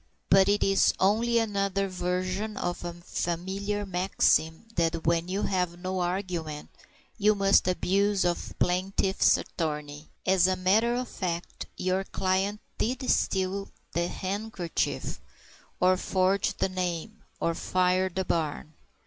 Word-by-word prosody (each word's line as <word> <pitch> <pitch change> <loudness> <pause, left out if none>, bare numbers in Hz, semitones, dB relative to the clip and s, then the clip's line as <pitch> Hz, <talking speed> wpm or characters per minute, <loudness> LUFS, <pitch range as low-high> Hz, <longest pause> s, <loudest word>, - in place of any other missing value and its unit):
But 195 0 +6
it 205 0 +3
is 195 0 +3
only 225 +5 +3
another 200 -3 0
version 185 +3 -2
of 175 0 -3
a 175 - -3
familiar 190 +4 -3
maxim, 180 -2 +1
that 165 -1 0
when 170 +1 +2
you 195 +3 -2
have 180 -3 0
no 185 +1 -3
argument, 175 -4 -3 0.5
you 210 +1 +4
must 195 -2 +4
abuse 195 +2 +2
the 175 -1 +2 0.2
plaintiff's 190 +1 +2
attorney. 150 -2 -4 0.2
As 185 -1 +4
a 185 - +2
matter 210 +6 +2
of 250 0 -2
fact, 175 -4 -4
your 185 +1 0
client 195 +2 -1 0.2
did 255 +3 -1
steal 195 +1 0 0.2
the 170 0 0
handkerchief, 190 - -3 0.6
or 185 +1 +4
forge 190 +1 +1
the - - +1
name, 185 +3 -3 0.2
or 170 - +1
fire 185 +2 +1
the 185 +1 -3
barn. 155 -2 -2
185 Hz, 130 wpm, -28 LUFS, 175-200 Hz, 0.6 s, But